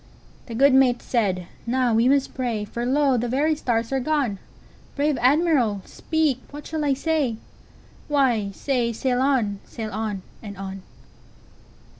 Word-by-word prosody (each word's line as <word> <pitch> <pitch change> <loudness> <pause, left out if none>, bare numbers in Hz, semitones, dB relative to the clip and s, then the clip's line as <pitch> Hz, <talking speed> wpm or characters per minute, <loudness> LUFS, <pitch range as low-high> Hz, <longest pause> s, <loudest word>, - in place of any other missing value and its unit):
The 230 - -6
good 275 +3 +5
mate 260 -2 +4
said: 195 -7 0 0.2
"Now 250 -1 +2
must 260 +5 +3
we - - -25
pray, 235 -5 -2
For 235 +3 -4
lo! 275 -1 +3
the 240 +1 -1
very 285 +6 +2
stars 235 -5 -1
are 270 - +1
gone. 265 -7 0 0.6
Brave 290 +1 +1
Admiral, 255 - +3
speak, 310 -5 -1
what 295 0 -9
shall 315 -1 -3
I 280 -2 +2
say?""Why, 265 -4 -2
say, 240 +2 -1
'Sail 250 +2 0
on! 240 -8 +1
sail 220 -2 -6
on! 210 -2 -3 0.2
and 205 -3 -8
on! 195 0 -6
250 Hz, 145 wpm, -24 LUFS, 220-280 Hz, 0.6 s, good